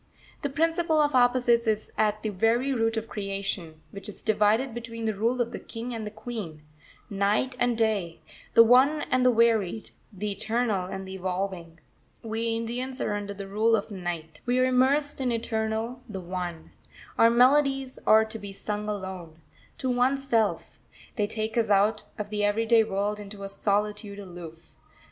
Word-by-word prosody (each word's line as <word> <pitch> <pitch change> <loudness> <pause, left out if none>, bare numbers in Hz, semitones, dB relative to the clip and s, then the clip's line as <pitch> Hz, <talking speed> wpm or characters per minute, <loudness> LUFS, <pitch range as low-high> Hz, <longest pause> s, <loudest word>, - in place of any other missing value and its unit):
This 285 -3 -2
principle 325 +1 +2
of 295 -1 +3
opposites 245 -2 +3
is 215 -1 0
at 215 0 +1
the 215 - -1
very 230 +7 +1
root 225 -2 0
of 220 0 -3
creation, 195 -6 -4
which 200 +1 -8
is 210 - -12
divided 220 +4 +2
between 230 -1 -6
the 220 - +1
rule 230 +5 0
of 240 -1 0
the - - -6
King 235 +1 -7
and 220 -2 -4
the - - -3
Queen; 210 -8 -7 0.4
Night 205 +6 0
and 245 -2 +1
Day; 205 -7 0 0.4
the 230 - +10
One 260 +6 +5
and 255 0 +3
the 250 - +6
Varied; 225 -3 +2 0.2
the 205 +1 -4
Eternal 215 -2 -1
and 190 0 -6
the 190 - -7
Evolving. 185 -3 -4 0.4
We 225 +1 -1
Indians 250 +3 -4
are 210 - -1
under 205 -1 -4
the 195 0 -7
rule 220 +3 +3
of 210 0 -3
Night. 170 -4 -5
We 245 +1 +2
are 255 - +4
immersed 270 +3 +2
in 255 - +1
the 235 - +1
Eternal, 225 +1 -2
the 195 -3 -5
One. 175 -2 -5 0.5
Our 230 - +7
melodies 270 +2 +3
are 220 0 +6
to 220 0 -7
be 200 -1 -7
sung 210 +1 -4
alone, 190 -5 -6 0.4
to 260 - -3
oneself; 245 -3 0 0.4
they 210 -3 0
take 220 +1 -3
us 225 - 0
out 210 +1 +3
of 210 0 -5
the 210 -1 -1
everyday 225 +2 +3
world 205 0 -2
into 200 -1 -8
a 195 - -5
solitude 205 +1 -1
aloof. 175 -4 -10
220 Hz, 175 wpm, -27 LUFS, 200-240 Hz, 0.5 s, the